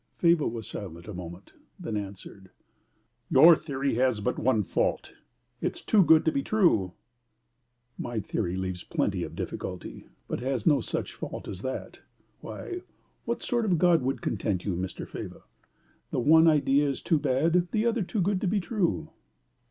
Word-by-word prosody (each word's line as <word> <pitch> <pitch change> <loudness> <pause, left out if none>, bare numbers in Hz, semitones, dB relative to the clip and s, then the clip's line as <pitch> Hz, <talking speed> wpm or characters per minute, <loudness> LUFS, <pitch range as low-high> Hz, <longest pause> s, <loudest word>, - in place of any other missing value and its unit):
Faber 170 -3 +3
was 115 -2 -5
silent 85 -4 -8
a 105 - -6
moment, 90 +1 -9 0.3
then 110 - -4
answered, 95 -1 -7 0.8
"Your 170 +1 +8
theory 140 -3 -2
has 125 -3 +2
but 100 - -1
one 110 -3 +2
fault: - - -1 0.5
it - - -1
is - - -10
too 210 -3 +5
good 160 0 +5
to 160 - +3
be 140 - 0
true." 135 - +2 1.1
"My 120 -2 -3
theory 95 -3 -2
leaves 95 -1 -4
plenty - - -1
of - - -5
difficulty, - - -6 0.2
but - - -3
has 130 -2 -2
no 145 -4 +4
such - - -4
fault - - -7
as 95 -2 -6
that. 130 +3 -5 0.4
Why, 360 0 -7 0.4
what - - -2
sort 240 -2 0
of 205 -4 +1
a - - +4
God 170 0 +4
would 135 +2 -2
content 100 -4 -1
you, 100 -4 -1
Mr. 90 +1 -5
Faber? - - -8 0.7
The - - -1
one 160 +6 +6
idea 145 -2 +3
is 135 - -4
too 160 - +2
bad, 165 +7 +2
the 220 0 +1
other 235 -1 +1
too 200 +2 -1
good 190 +1 +1
to - - 0
be 200 +3 +1
true. 175 -5 -1
135 Hz, 175 wpm, -28 LUFS, 105-170 Hz, 1.1 s, Your